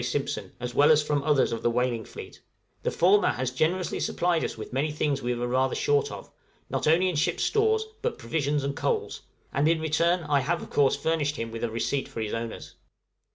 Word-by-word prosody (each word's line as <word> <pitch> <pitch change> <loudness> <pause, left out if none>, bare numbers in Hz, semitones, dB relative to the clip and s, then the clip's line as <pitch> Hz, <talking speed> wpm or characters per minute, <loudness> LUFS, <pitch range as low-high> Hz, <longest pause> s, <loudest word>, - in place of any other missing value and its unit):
Simpson, - - -2
as 125 0 -4
well 145 +4 +5
as 155 -1 +5
from 150 -1 0
others 145 -2 +2
of 115 - -3
the - - +2
whaling 120 -1 0
fleet; - - -11 0.4
the - - 0
former 200 +4 +4
has 130 0 -1
generously 170 +7 0
supplied 175 -2 0
us - - -3
with 110 - -8
many 145 +4 0
things 145 -2 -1
we 125 -1 -1
were 120 +1 -2
rather 130 +1 +1
short 145 -1 +1
of, - - -9 0.4
not - - -1
only 170 +4 +4
in 180 - -1
ship's 150 - 0
stores, 440 0 +2 0.2
but 480 - -2
provisions 145 -2 -1
and 140 0 -2
coals, - - -2 0.3
and 140 +3 +2
in 165 0 +3
return 165 +3 +1
I 145 -2 +2
have 165 +6 -1
of - - -11
course 140 -2 +3
furnished 155 -2 0
him 115 -3 -4
with 115 0 -6
a 120 - 0
receipt 115 +5 -1
for - - -8
his 110 -1 -3
owners. 115 0 -5
145 Hz, 215 wpm, -27 LUFS, 125-160 Hz, 0.4 s, well